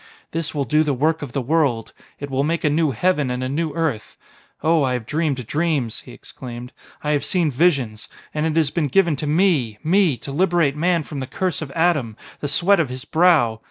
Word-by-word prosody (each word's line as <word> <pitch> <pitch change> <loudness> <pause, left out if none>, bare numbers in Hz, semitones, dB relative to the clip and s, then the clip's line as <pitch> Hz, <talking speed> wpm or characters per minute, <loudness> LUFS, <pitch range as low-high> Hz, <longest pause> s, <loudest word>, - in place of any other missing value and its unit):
"This 165 -1 -3
will 140 -2 0
do 150 +2 +2
the 150 -3 0
work 155 +5 +1
of 140 -4 -6
the 135 - -1
world: 135 -5 0 0.3
it 145 -1 -6
will 135 +1 +1
make 165 +3 -1
a 150 - +2
new 155 +1 +2
heaven 150 +2 +1
and 125 +1 -2
a - - -1
new 155 +4 -2
earth! 155 -10 -2 0.5
Oh, 160 0 +3
I 130 -2 +1
have 125 -3 -3
dreamed 145 -3 -1
dreams," 145 -4 -1
he - - -13
exclaimed, 125 0 -9 0.3
"I 150 - 0
have 145 -1 +1
seen 170 -5 +1
visions. 130 -7 +1 0.3
And 155 +1 0
it 155 - -2
has 155 -4 +2
been 155 -2 0
given 170 +2 +3
to 150 - -3
me 150 - +2
me! 170 -4 +3
to 140 - -8
liberate 170 -2 +2
man 170 +1 +1
from 145 -1 -7
the 130 - -4
curse 185 +3 -2
of 155 - -5
Adam... 150 -10 +1 0.2
the 145 - -3
sweat 180 +7 +3
of 155 -6 +1
his 130 +1 -6
brow.... 155 -11 +3
150 Hz, 220 wpm, -21 LUFS, 130-165 Hz, 0.5 s, Oh